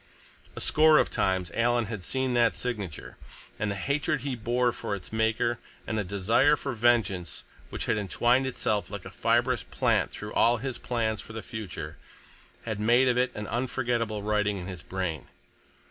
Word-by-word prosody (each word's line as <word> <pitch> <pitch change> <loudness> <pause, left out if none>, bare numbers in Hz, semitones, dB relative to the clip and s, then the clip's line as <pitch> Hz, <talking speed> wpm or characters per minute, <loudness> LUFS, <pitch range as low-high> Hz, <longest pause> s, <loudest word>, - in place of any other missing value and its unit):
A - - -5
score 155 0 +5
of - - +2
times 95 -2 0
Alan 120 0 +2
had 105 -3 -6
seen 130 +4 -1
that 120 -1 +3
signature, 105 -11 -5 0.4
and 105 -2 0
the 100 - -2
hatred 140 - 0
he 135 -1 -2
bore 120 +2 +1
for 105 - -4
its 100 +2 -10
maker, 110 +1 +1 0.3
and 110 - -3
the 105 - 0
desire 105 +10 +3
for 135 -2 -4
vengeance 110 -8 +1 0.3
which - - -4
had 110 -2 +1
entwined 120 +6 +2
itself 110 -5 -1
like 100 -2 -7
a - - -8
fibrous - - +2
plant - - +1
through 105 0 -8
all 120 +1 +4
his 130 +1 -4
plans 110 -3 -1
for 110 - -11
the 115 - -6
future, 110 -6 -6 0.7
had 110 -3 -3
made 120 +4 +4
of 125 - +3
it 125 - +2
an 105 - -4
unforgetable 120 -3 -1
writing 105 -1 +1
in 90 - -6
his 90 -2 -7
brain. 85 -7 -4
110 Hz, 175 wpm, -28 LUFS, 100-120 Hz, 0.7 s, score